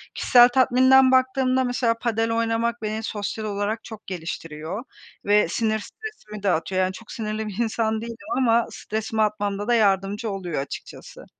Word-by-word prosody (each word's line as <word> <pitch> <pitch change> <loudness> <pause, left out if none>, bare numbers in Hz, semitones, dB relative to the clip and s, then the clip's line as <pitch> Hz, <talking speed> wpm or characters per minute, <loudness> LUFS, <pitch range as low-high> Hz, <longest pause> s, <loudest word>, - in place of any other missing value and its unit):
Kişisel 245 -1 +6
tatminden 260 +1 +5
baktığımda 260 0 +2
mesela 245 -2 +1
padel 225 -1 0
oynamak 230 0 0
beni 215 +1 -3
sosyal 215 +1 -4
olarak 205 +2 -2
çok 220 -1 -11
geliştiriyor 165 +2 -5 0.4
ve 205 -1 +4
sinir, 220 +4 0
stresimi 215 - -10
de 200 - +2
atıyor. 185 +3 0
Yani, 185 0 0
çok 225 +3 -12
sinirli 215 -1 -4
bir 205 0 -7
insan 220 -1 -1
değilim 230 0 -6 0.2
ama 235 -3 +3
stresimi 220 +1 -3
atmamda 205 -1 -1
da 240 - +3
yardımcı 205 0 +1
oluyor 180 -7 -3
açıkçası. 140 - -9
220 Hz, 155 wpm, -24 LUFS, 205-235 Hz, 0.4 s, Kişisel